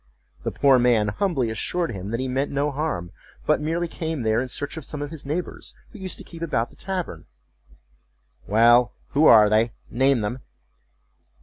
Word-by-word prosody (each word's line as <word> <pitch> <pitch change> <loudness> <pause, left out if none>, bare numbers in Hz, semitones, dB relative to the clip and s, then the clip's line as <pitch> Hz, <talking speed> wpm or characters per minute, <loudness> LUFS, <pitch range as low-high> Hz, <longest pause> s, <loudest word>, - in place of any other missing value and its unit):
The - - -2
poor 135 -2 +4
man 120 -4 +3
humbly 130 - 0
assured 170 +9 -2
him 95 -2 -6
that 115 +2 -2
he 130 - -2
meant 135 +2 -1
no 145 +1 0
harm, 140 - -3 0.3
but - - +2
merely 165 +3 -1
came 160 -5 -4
there 110 +1 +2
in 130 - -3
search 145 +4 -4
of 160 - -7
some 150 - -5
of 145 0 -5
his 155 -4 -8
neighbors, 170 +5 -4 0.2
who 220 - -12
used 190 -1 -3
to - - -9
keep 165 -1 -12
about 120 -8 -1
the - - -19
tavern."Well—who 85 - -1
are 110 -2 +8
they?—name 120 +4 +1
them." 105 +5 -3
130 Hz, 170 wpm, -24 LUFS, 110-155 Hz, 0.3 s, are